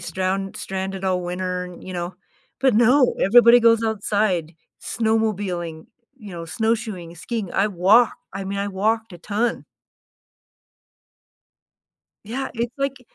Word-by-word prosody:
stround 190 +2 -2
stranded 190 0 -4
all 185 -1 0
winter, 180 0 -4
you 185 - -8
know?" 175 0 -4 0.5
But 265 -4 +3
no, 250 +3 +4
everybody 240 +3 +7
goes 230 0 +4
outside, 205 -6 0 0.3
snowmobiling, 205 -8 -1 0.3
you 210 -6 -11
know, 170 -1 -6
snowshoeing, 215 -3 -2
skiing. 210 +2 -4
I 195 - +2
walk 205 +6 +4 0.2
I 195 0 -5
mean, 200 +1 -3
I 200 0 -1
walked 215 +2 -1
a 175 - -10
ton. 220 +6 -2 2.6
Yeah. 255 +6 -4
It's 235 0 -2
like 275 -1 -2
200 Hz, 125 wpm, -22 LUFS, 185-230 Hz, 2.6 s, everybody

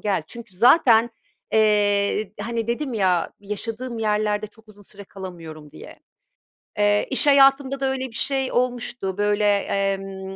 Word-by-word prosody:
gel. 200 -6 -1
Çünkü 230 -1 -10
zaten, 235 - +5 0.4
eee, 205 -1 +2
hani, 230 -1 -3
dedim 245 +2 -3
ya, 185 -5 0
"Yaşadığım 225 +4 -6
yerlerde 210 -1 -1
çok 220 +1 -21
uzun 205 -1 -16
süre 200 0 -13
kalamıyorum." 165 -6 -10
diye. - - -13 0.8
Eee, 205 0 +2
iş 265 - +1
hayatımda 275 -1 +4
da 270 - -1
öyle 260 0 -3
bir 245 - -16
şey 265 +2 -1
olmuştu, 245 -6 -2
böyle, 205 0 +1
emm, 195 -1 -1
210 Hz, 140 wpm, -22 LUFS, 195-240 Hz, 0.8 s, zaten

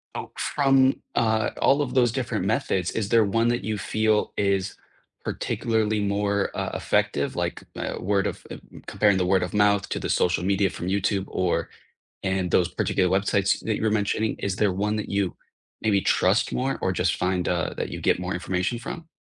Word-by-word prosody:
Oh, - - -6
from, 135 -2 +2
uh, 110 -1 +2
all 140 +2 +4
of 130 -3 -3
those 120 -3 +4
different 130 0 -2
methods, 90 -2 0
is 105 -3 -2
there 115 -1 +5
one 115 +4 +1
that 120 0 0
you 105 0 -2
feel 110 +1 +1
is 100 -1 0 0.5
particularly 110 -2 -1
more, 100 0 0
uh, - - -2
effective? - - 0
Like, - - -3
uh, - - -3
word 100 0 +1
of - - -6
uh, - - -6
m - - -13
comparing 105 -2 +2
the 90 - +1
word 95 +1 +3
of 90 - -3
mouth 100 -1 +3
to - - -2
the - - -4
social 90 -1 +1
media 100 0 +2
from 90 - -6
YouTube 100 0 0
or 90 -1 -1 0.5
and 95 -2 -1
those 90 - +3
particular 90 -2 0
websites 100 0 +1
that 110 -2 0
you - - -5
were 110 - +2
mentioning. 110 +1 0
Is 100 -1 -2
there 105 -3 +2
one 105 +3 -1
that 105 - -4
you 100 -3 -1 0.5
maybe 105 -3 +3
trust 95 +3 +2
more 135 +2 -1
or 95 - 0
just 90 0 0
find, 90 0 0
uh, 85 -2 -1
that - - -3
you - - -6
get - - +2
more 90 +1 -3
information 90 +6 -2
from? 160 +7 -7
100 Hz, 195 wpm, -25 LUFS, 95-110 Hz, 0.5 s, there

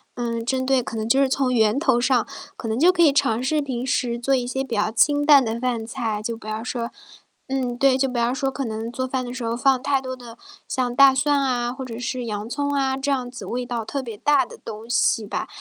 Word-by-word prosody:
嗯， 230 -1 -3
针 260 +1 0
对 265 -1 +2
可 230 - -6
能 220 0 -2
就 265 - +4
是 275 - +4
从 265 -1 0
源 220 0 +3
头 285 -6 +2
上， 250 -2 +2 0.3
可 - - -6
能 220 +2 -1
就 345 +5 +6
可 360 -2 0
以 315 -4 +6
尝 255 -5 +1
试 300 +4 +1
平 255 -3 -4
时 240 -2 -1
做 270 +3 +2
一 250 -2 -1
些 265 +2 -2
比 245 -4 -4
较 210 +1 +1
清 290 +6 +3
淡 290 -3 +7
的 225 0 -3
饭 245 -2 -1
菜， 220 -2 -3
就 230 +2 -3
不 225 - -15
要 215 +1 -4
说 235 -1 -4 0.6
嗯， 255 -2 -2
对， 270 0 +4
就 270 0 +1
不 250 - -4
要 235 +1 +1
说 270 +1 -1
可 270 0 -4
能 225 +1 -4
做 260 +1 -3
饭 260 0 -2
的 245 - -6
时 255 -1 -5
候 230 0 -1
放 265 0 +3
太 275 -2 +1
多 260 -1 -5
的 240 -2 -12 0.3
像 245 -2 -1
大 275 +1 +7
蒜 280 +2 +2
啊、 245 -3 0
或 265 +1 -7
者 235 -3 -7
是 250 +1 -3
洋 210 0 -4
葱 285 +2 -2
啊， 270 -1 +1
这 275 +1 -1
样 255 -3 -1
子 245 - -9
味 250 +1 -3
道 240 -2 -3
特 275 +5 -4
别 230 -5 -8
大 285 +2 +3
的 - - -12
东 225 +1 -8
西 230 -2 +2
吧。 200 - -4
250 Hz, 280 characters per minute, -23 LUFS, 235-270 Hz, 0.6 s, 淡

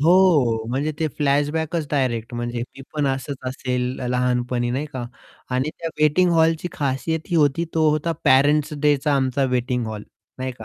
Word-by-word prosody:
हो, 150 -10 +4
म्हणजे 145 +5 -1
ते 160 - +1
फ्लॅशबॅकच 150 +3 0
डायरेक्ट 125 -5 -1
म्हणजे 120 0 -3 0.2
मी 135 - -9
पण 150 -2 0
असंच 135 +1 -2
असेल 125 -1 -2 0.3
लहानपणी 125 -1 0
नाही 135 +5 -2
का, 130 -2 -4 0.5
आणि 130 +4 0
त्या 165 - -3
वेटिंग 175 +4 +4
हॉलची 165 +1 +2
खासियत 145 +3 -1
ही 170 - +2
होती, 150 +1 +3
तो 160 -1 +4
होता 155 +2 0
पेरेंट्स 145 +3 +4
डेचा 145 0 +2
आमचा 135 0 +1
वेटिंग 125 -1 0
हॉल 110 -1 -5 0.4
नाही 130 0 -3
का. 110 - -9
140 Hz, 165 wpm, -22 LUFS, 125-155 Hz, 0.5 s, हो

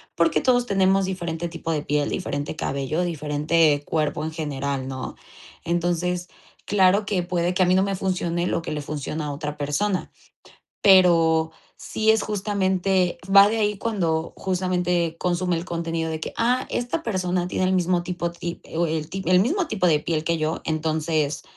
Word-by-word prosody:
porque 325 - +2
todos 245 -1 +3
tenemos 195 -2 +2
diferente 175 -3 -3
tipo 165 0 -5
de 150 -2 -1
piel, 145 -1 0
diferente 145 +2 -3
cabello, 140 +3 -2
diferente 150 -1 +1
cuerpo 155 -1 -1
en 160 - -3
general, 140 -4 -3
¿no? 130 -1 -6 0.5
Entonces, 175 +1 -1 0.4
claro 200 +1 +3
que 195 -2 0
puede 175 0 -1
que 185 - 0
a - - +3
mí 185 - +4
no 190 - +4
me 195 0 -1
funcione 175 -2 -1
lo - - -1
que - - -5
le 150 -1 -3
funciona 150 +1 -4
a 145 - -3
otra 150 +1 -5
persona, 165 +7 -1 0.7
pero 165 -4 +5 0.3
sí 220 0 -1
es, 220 -1 +1
justamente 190 -3 0
va 200 0 +9
de 225 +1 -1
ahí 210 -1 +1
cuando, 170 -8 -1
justamente, 180 -3 0
consume 180 0 0
el 165 - -4
contenido 165 -2 -2
de 160 0 -3
que: - - -5
"Ah, 245 +2 +1
esta 265 +8 -2
persona 180 - -1
tiene 185 - -1
el 185 - +2
mismo 180 -1 +2
tipo 175 -1 -3
ti 170 0 -6
eh, - - -8
o 170 0 +2
el 155 0 -3
ti 195 +2 -4
el 180 0 +5
mismo 335 - 0
tipo 195 -8 -1
de 155 -2 +4
piel 155 0 -2
que 170 -1 +1
yo, 155 +1 -1
entonces, 155 -1 -1
175 Hz, 180 wpm, -24 LUFS, 160-190 Hz, 0.7 s, va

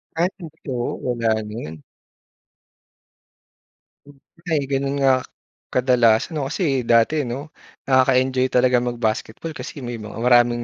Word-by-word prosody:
Ay 170 +2 +2
totoo, 150 -8 -6 0.2
wala 120 -2 0 0.2
na 105 - -8
'yun. 80 -8 -7 2.3
Hmm 140 -1 -18 0.3
ay 155 -4 +1
ganun 135 0 -1
nga 130 -1 +4 0.5
kadalas 125 0 +3
'no 145 -4 -2
kasi 140 - -1
dati 120 +5 +3
'no, 140 +6 -6 0.4
nakaka-enjoy 130 0 +3
talaga 125 0 +3
mag-basketball 120 +4 -3
kasi 140 -5 -8
may 120 -1 -5
mga 105 0 -9
maraming 120 -1 +4
130 Hz, 120 wpm, -21 LUFS, 120-140 Hz, 2.3 s, nga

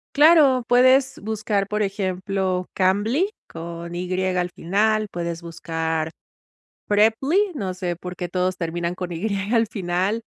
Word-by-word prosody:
Claro, 290 -4 +6
puedes 260 +2 +4
buscar, 210 -2 -1
por 210 +1 0
ejemplo, 190 -2 -1
Cambly 210 - +2 0.2
con 170 +1 -7
"y" 180 +1 -4 0.2
al 180 0 0
final, 215 +5 +1
puedes 170 -2 -4
buscar 160 -1 -3 0.8
Preply, 225 - +3 0.2
no 195 -8 -3
sé 180 -1 -3
por 180 +1 -8
qué 180 -1 -5
todos 185 +1 0
terminan 170 0 -3
con 180 -1 -5
"y" 170 +4 -4 0.3
al 230 -1 +4
final, 190 +2 -1
185 Hz, 135 wpm, -23 LUFS, 175-220 Hz, 0.8 s, Claro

